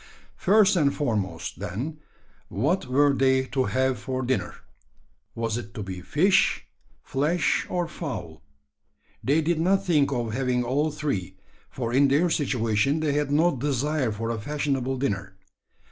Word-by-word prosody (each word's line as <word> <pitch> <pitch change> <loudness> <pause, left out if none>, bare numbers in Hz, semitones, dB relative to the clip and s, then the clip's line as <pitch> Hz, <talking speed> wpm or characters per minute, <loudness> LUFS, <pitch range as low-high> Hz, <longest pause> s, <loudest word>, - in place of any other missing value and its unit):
First 205 +1 +4
and 145 -5 +3
foremost, 100 - -2
then, 115 - -4 0.5
what 145 - 0
were 140 +2 +3
they 130 0 +3
to 130 -2 +2
have 130 -2 0
for 130 +3 -3
dinner? 130 +1 -1 0.8
Was 115 0 -1
it 110 -4 -10
to 105 - -4
be 95 -2 -6
fish, 185 - +2 0.4
flesh, 150 +6 0
or 175 -2 -1
fowl? 140 - -6 0.8
They 145 +5 +3
did 160 +1 0
not 190 +3 +2
think 150 -6 +3
of 120 -4 -2
having 125 -1 0
all 140 +6 +1
three: 145 - -3 0.3
for 120 -2 -4
in 140 +2 +5
their 155 +6 +2
situation 130 -1 +1
they 150 -2 +1
had 145 -1 0
no 160 +2 +3
desire 140 0 0
for 115 +2 -3
a 115 - -3
fashionable 135 -1 -1
dinner. 100 -7 -3
135 Hz, 145 wpm, -25 LUFS, 115-150 Hz, 0.8 s, in